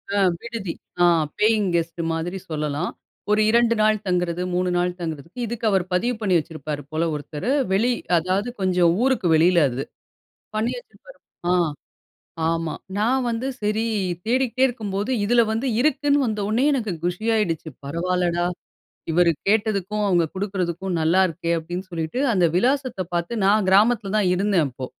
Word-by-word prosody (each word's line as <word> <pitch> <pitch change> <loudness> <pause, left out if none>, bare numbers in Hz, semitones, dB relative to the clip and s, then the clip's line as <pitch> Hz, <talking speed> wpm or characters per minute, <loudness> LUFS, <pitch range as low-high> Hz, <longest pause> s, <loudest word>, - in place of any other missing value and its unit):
ஆ - - +2 0.2
விடுதி. 230 -7 -5 0.3
ஆ - - +6 0.4
paying 215 -2 +3
guest 170 0 -1
மாதிரி 175 +4 -3
சொல்லல்லாம். 150 +1 -2 0.4
ஒரு 210 - +4
2 235 0 +4
நாள் 215 0 +4
தங்கறது, 180 -1 0
3 180 0 +1
நாள் 180 0 +1
தங்கறதுக்கு 165 - -6
இதுக்கு 230 0 -4
அவர் 190 -3 +2
பதிவு 240 +7 +1
பண்ணி 190 -4 +2
வச்சிருப்பார் 150 -1 -6
போல 160 +2 0
ஒருத்தர். 150 - -5 0.2
வெளி 225 +6 +2 0.3
அதாவது 185 +7 0
கொஞ்சம் 180 -2 +3
ஊருக்கு 260 -9 +2
வெளியில 170 +2 +4
அது. 130 +3 -3 0.7
பண்ணி 225 +3 0
வச்சிருப்பாரு - - -16 0.3
ஆ. - - +4 1.0
ஆமா. 165 -1 -1 0.2
நான் 250 +5 +2
வந்து, 235 +3 -2
சரி 210 +2 0 0.4
தேடிக்கிட்டே 255 +1 +1
இருக்கும்போது 210 -2 -3
இதில 235 +3 +4
வந்து 225 +5 -1
இருக்குன்னு 290 +1 +2
வந்தவுன்னே 215 +2 0
எனக்கு 225 -7 -1
குஷியாடுச்சு, 180 -3 0
"பரவாயில்லடா, 175 +3 0 0.7
இவர் 175 0 +4 0.2
கேட்டதுக்கும் 210 -1 +1
அவங்க 175 -3 +3
கொடுக்குறதுக்கும் 190 -2 -2
நல்லா 165 +4 +3
இருக்கே!" 170 0 -3
அப்பிடின்னு 175 +3 -6
சொல்லிட்டு, 165 +8 -3
அந்த 180 -5 +3
விலாசத்த 255 -2 +1
பாத்து 175 +7 -1
நான் 200 0 +3
கிராமத்தில 205 +1 +3
தான் 205 -3 +2
இருந்தேன், 190 -4 +2
அப்போ. 130 0 -7
190 Hz, 140 wpm, -23 LUFS, 170-225 Hz, 1.0 s, ஆ